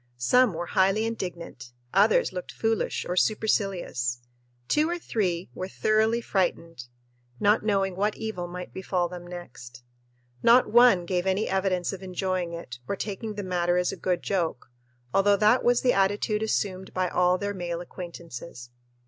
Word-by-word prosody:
Some 215 - +3
were 170 +2 -3
highly 195 +5 +2
indignant, 170 - -6 0.2
others 205 0 +4
looked 180 -1 -6
foolish 225 -1 -1
or 180 - -2
supercilious, 185 - 0 0.4
two 305 - +2
or 350 - -1
three 185 - -2
were 185 - -5
thoroughly 220 +3 +1
frightened, 170 - -2 0.5
not 205 +2 +3
knowing 195 -3 0
what 205 +3 0
evil 215 -6 -4
might 180 +1 -8
befall 185 -2 -1
them 175 0 -9
next. 130 -8 -10 0.6
Not 240 +2 +6
one 235 -6 +6
gave 180 +1 -1
any 190 +3 +1
evidence 190 -1 0
of 195 - -7
enjoying 185 -1 -2
it 145 -8 -8
or - - -1
taking 210 +2 -5
the 205 - -4
matter 175 -1 0
as 180 0 +1
a - - -5
good 180 -2 -1
joke, 165 -10 -2 0.4
although 200 +1 +4
that 215 +5 +4
was 245 0 +3
the 250 - +3
attitude 205 +2 +1
assumed 190 -3 -2
by 185 0 +1
all 180 +1 +2
their 205 +1 -3
male 175 -3 -4
acquaintances. 170 -8 -9
185 Hz, 155 wpm, -26 LUFS, 175-210 Hz, 0.6 s, Not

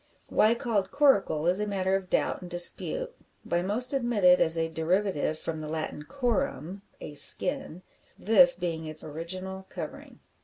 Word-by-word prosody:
Why 220 +2 +3
called 230 -6 -2
"coracle" 265 - +2
is 180 +3 +1
a 210 - -2
matter 190 -1 -1
of 190 -1 -4
doubt - - -1
and 180 - -9
dispute; 475 - 0 0.3
by 175 - -1
most 225 +8 0
admitted 215 -9 +3
as 165 0 +4
a 165 0 0
derivative 165 -1 -1
from 160 0 -5
the 155 - -7
Latin 155 -1 -5
corum 200 - -3 0.2
a 150 - -9
skin; 185 - +3 0.3
this 260 +5 +5
being 165 -3 -4
its 155 0 0
original 185 +5 -7
covering. 165 -5 -9
185 Hz, 155 wpm, -27 LUFS, 160-220 Hz, 0.3 s, this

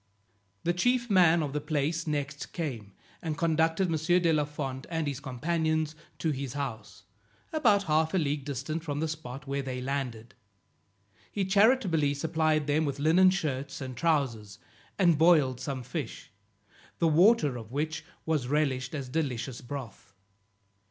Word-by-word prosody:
The 175 - +1
chief 240 +5 +1
man 170 -4 +5
of 140 -2 -4
the 150 - -1
place 155 +2 -1
next 145 -1 -3
came, 120 - -4 0.3
and 160 -2 -3
conducted 165 +2 +2
M. 165 - 0 0.2
de 170 -2 +2
la 150 -1 +2
Fond 135 -3 -5
and 165 -2 -1
his 140 -2 -3
companions 155 +3 -1 0.2
to 160 - 0
his 135 -3 -4
house, 125 -7 -6 0.5
about 215 -10 +4
a - - -14
half 155 +2 +2
a - - +4
league 145 -4 0
distant 150 +4 -4
from 145 -3 -3
the 160 - 0
spot 145 -3 -7
where 140 0 -2
they 130 -2 -4
landed. 125 -4 -4 1.0
He 200 -2 -1
charitably 190 - +3
supplied 155 0 +1
them 150 +2 +2
with 140 -2 -2
linen 165 +6 +5
shirts 140 -7 -2
and 130 -2 -6
trowsers, 120 -10 0 0.4
and 175 -6 +4
boiled 155 -7 +4
some 135 -3 -4
fish, 125 -2 -6 0.7
the 170 - +2
water 165 - +4
of 115 -2 -8
which 155 +4 -2 0.2
was 155 -6 0
relished 135 -2 0
as 135 -3 -4
delicious 130 -4 -3
broth. 120 -6 -8
150 Hz, 155 wpm, -29 LUFS, 135-165 Hz, 1.0 s, man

